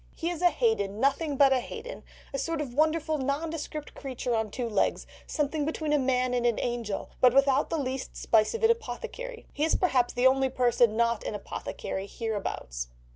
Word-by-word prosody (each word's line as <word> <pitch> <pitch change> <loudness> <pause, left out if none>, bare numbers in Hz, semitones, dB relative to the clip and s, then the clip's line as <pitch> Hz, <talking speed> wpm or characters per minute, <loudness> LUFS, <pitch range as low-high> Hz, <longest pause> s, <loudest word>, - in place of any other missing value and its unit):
He 335 +1 -2
is 345 -1 -5
a 355 - +6
Haden, 220 - 0
nothing 280 +3 +1
but 275 -1 +6
a 260 - +3
Haden, 485 - -7 0.3
a 275 - -1
sort 330 +2 -2
of 275 -5 -4
wonderful 315 +1 +1
nondescript 300 +2 -3
creature 255 -3 -4
on 220 -1 0
two 240 +3 -3
legs, 210 -3 0 0.2
something 300 0 -1
between 310 0 -1
a 295 - +4
man 255 -1 +1
and 245 -1 +1
an 235 -2 +2
angel, 235 -4 -3
but 250 0 +6
without 275 -1 +4
the 330 - -1
least 265 -2 -4
spice 220 - +3
of 460 - -4
an 450 - +7
apothecary. 470 +1 -5
He 295 - -1
is 320 - +3
perhaps 260 -9 +2
the 245 +1 +1
only 265 0 +4
person 240 -3 +3
not 235 -1 +2
an - - -3
apothecary 195 -1 -5
hereabouts." 200 - -4
265 Hz, 190 wpm, -28 LUFS, 235-310 Hz, 0.3 s, an